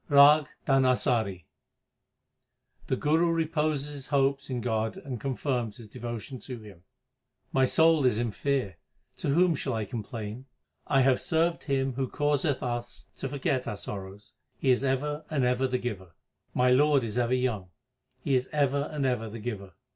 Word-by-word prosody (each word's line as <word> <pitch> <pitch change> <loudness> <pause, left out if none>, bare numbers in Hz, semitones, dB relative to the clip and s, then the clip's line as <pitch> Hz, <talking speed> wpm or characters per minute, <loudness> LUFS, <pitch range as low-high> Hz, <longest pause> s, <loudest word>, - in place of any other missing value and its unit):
RAG 145 +1 +7 0.2
DHANASARI 125 - +2 1.4
The - - +1
Guru 160 +3 +2
reposes 155 -3 0
his 140 -2 -5
hopes 140 0 +1
in 125 -2 -2
God 110 -2 -1
and 125 -5 -6
confirms 125 -5 -2
his 115 - -11
devotion 120 +2 -6
to 125 -1 -7
Him: 100 -5 -13 0.7
My 130 0 +4
soul 160 0 +4
is 120 - +2
in 120 -1 -1
fear; 130 - -1 0.4
to - - -3
whom 170 +4 +4
shall 140 -3 -2
I 110 -1 -2
complain? 110 +3 -6 0.4
I 135 -2 +4
have 130 -1 +3
served 165 +1 +1
Him 135 -2 0
who 130 0 -2
causeth 145 -1 0
us 120 -1 -4
to 135 - -4
forget 135 -2 -1
our - - -2
sorrows; 100 +2 -6 0.2
He 135 - +2
is 125 +1 +2
ever 145 +3 -1
and 145 -4 0
ever 125 +1 +2
the 130 0 0
Giver. 100 -8 -6 0.4
My 125 0 +4
Lord 145 +1 +4
is 115 +1 -2
ever 120 +1 +2
young; 115 -8 -1 0.5
He 140 - 0
is 130 0 +1
ever 140 -1 +1
and 150 -3 -1
ever 120 -4 0
the 110 - -7
Giver. 105 -4 -6
130 Hz, 165 wpm, -28 LUFS, 115-140 Hz, 1.4 s, RAG